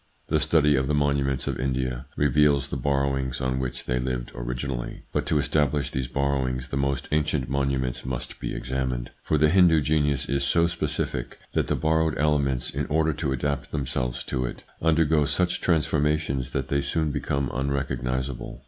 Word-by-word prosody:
The - - +3
study 75 -3 +4
of 65 0 +1
the 75 - +1
monuments 70 -2 +1
of - - -2
India 65 -1 -2
reveals 70 0 +3
the - - -3
borrowings 70 -1 0
on 65 0 -1
which 65 -2 -4
they 60 0 0
lived 65 -1 -3
originally, - - -4
but - - -1
to 75 - +2
establish 75 -1 +1
these 65 -1 -2
borrowings 65 -1 -1
the - - -3
most 70 -1 -1
ancient 75 -3 +1
monu 70 -1 +1
ments 65 -2 -3
must 65 -1 -5
be - - -4
examined, 65 0 -2
for 75 - +1
the 75 +1 +4
Hindu 90 -3 +6
genius 75 -2 +1
is 70 0 0
so 85 +4 +3
specific, 75 -7 -2 0.2
that - - +1
the - - +1
borrowed 80 0 +1
elements, 70 -4 +1
in - - -2
order 80 +1 +2
to 75 -2 -2
adapt 70 +1 -1
themselves 65 -3 -2
to 65 - -2
it, - - -5 0.2
undergo 80 -2 +3
such 85 +5 0
transformations 75 -5 +1
that 65 -1 -2
they 70 0 +1
soon 80 +1 0
become 70 -1 -1
unrecognisable. 65 -1 -2
70 Hz, 175 wpm, -26 LUFS, 65-75 Hz, 0.2 s, Hindu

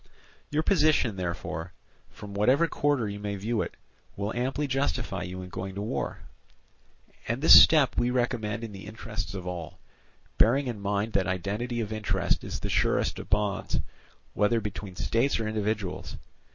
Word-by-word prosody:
"Your 150 +2 0
position, 155 - +3
therefore, 85 -2 -4 0.4
from 105 -1 -10
whatever 130 +11 +3
quarter 145 -7 +1
you 100 0 -5
may 105 0 -3
view 110 +3 -1
it, - - -5 0.4
will 100 +2 -3
amply 130 +4 -1
justify 135 - -1
you 90 +1 -5
in 90 - -9
going 95 +1 -6
to 100 - -3
war; 105 - -3 1.1
and 115 +2 -1
this 160 - +10
step 150 -5 +5
we 120 - +2
recommend 120 -3 -1
in 115 - -5
the 100 0 -9
interests 105 -3 -5
of 95 -2 -6
all, 90 -3 -6 0.6
bearing 135 +5 +4
in 120 -5 -4
mind 100 +2 -1
that 95 - +2
identity 105 +6 -2
of 110 -1 -4
interest 110 -1 0
is - - -5
the - - -2
surest - - +1
of - - -9
bonds, 105 -1 0 0.5
whether 110 +3 +2
between 100 -3 -6
states 115 +9 +1
or 110 - -2
individuals. 105 -3 -3
105 Hz, 165 wpm, -28 LUFS, 100-120 Hz, 1.1 s, this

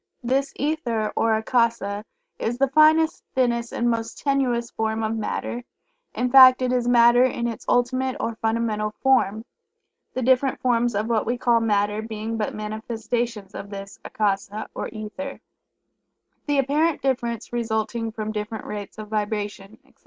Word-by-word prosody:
This 270 +3 0
Ether 245 -8 -1
or 225 -1 +2
Akasa 220 -3 0 0.3
is 240 +2 -2
the 275 0 +2
finest, 310 +3 +4
thinnest 240 -2 +1
and 240 - -1
most 230 -1 -1
tenuous 255 -4 0
form 220 0 -2
of 220 +1 -1
Matter, 235 +2 -3 0.5
in 250 0 0
fact 260 -1 +8
it 250 0 +1
is 245 -1 0
Matter 240 0 +6
in 240 -2 0
its 230 -2 -6
ultimate 255 +1 +1
or 230 - -2
fundamental 220 -1 -1
form, 225 -5 +2 0.7
the 255 - -1
different 260 +2 +2
forms 240 -2 +1
of 210 +2 0
what 225 -3 0
we 240 +1 0
call 240 -1 +3
Matter 210 -1 +1
being 220 0 -5
but 215 -2 -2
manifestations 220 0 -4
of 200 - -7
this 195 0 -8
Akasa 205 0 -2
or - - -4
Ether, 220 +6 -7 1.1
the 290 -1 +1
apparent 295 +4 +1
difference 240 -4 -2
resulting 225 0 -2
from 215 -1 -4
different 210 0 -5
rates 205 0 -7
of 215 -1 -7
vibration, 210 -1 -3
etc. - - -27
230 Hz, 155 wpm, -24 LUFS, 215-250 Hz, 1.1 s, fact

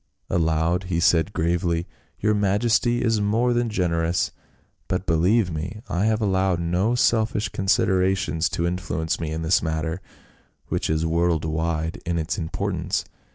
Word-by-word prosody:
Aloud 80 +2 +1
he 90 -2 -1
said 85 +2 +3
gravely, 85 -1 0 0.3
"Your 105 +1 +2
majesty 110 +4 +2
is 115 -3 +2
more 115 +4 +2
than 120 -1 0
generous; 85 -4 0 0.6
but 95 0 -2
believe 90 +5 +2
me, 85 +7 -5
I 95 +1 0
have 110 0 +1
allowed 95 -3 +1
no 90 +7 +1
selfish 110 -3 +1
considerations 95 -3 +1
to 85 - -2
influence 80 -2 -2
me 80 -2 -3
in 80 +1 -3
this 80 +3 +3
matter, 80 +2 -2 0.7
which - - -1
is 80 +1 +1
world 85 -1 +1
wide 80 +1 -2
in 85 0 -1
its 80 +4 -2
importance. 90 +2 -2
90 Hz, 145 wpm, -24 LUFS, 80-100 Hz, 0.7 s, said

